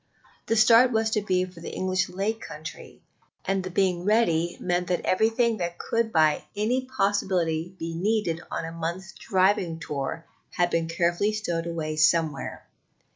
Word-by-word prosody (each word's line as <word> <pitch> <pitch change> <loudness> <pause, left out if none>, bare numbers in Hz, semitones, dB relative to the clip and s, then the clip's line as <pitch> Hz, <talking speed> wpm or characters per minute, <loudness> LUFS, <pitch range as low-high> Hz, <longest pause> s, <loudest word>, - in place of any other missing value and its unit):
The 225 - +2
start 230 +3 +6
was 220 -1 +1
to 215 - +1
be 185 -2 +1
for 180 -2 -13
the 165 - -7
English 185 0 0
Lake 205 +4 -2
Country, 155 +1 -9 0.4
and 195 -1 0
the 185 - -4
being 180 -1 +1
ready 175 -5 +2
meant 180 0 -1
that 180 -1 0
everything 225 +3 +2
that 175 -2 -3
could 230 -1 -1
by 155 -4 +3
any 240 +5 0
possibility 190 -8 0
be 165 -1 -5
needed 180 -2 0
on 165 - -3
a 165 - -6
month's 170 +3 -5
driving 185 -3 +1
tour 150 +2 -4 0.3
had 175 0 +1
been 165 -1 0
carefully 175 +5 +1
stowed 170 -6 -2
away 155 -2 -3
somewhere. 160 -2 +1
180 Hz, 160 wpm, -26 LUFS, 165-210 Hz, 0.4 s, start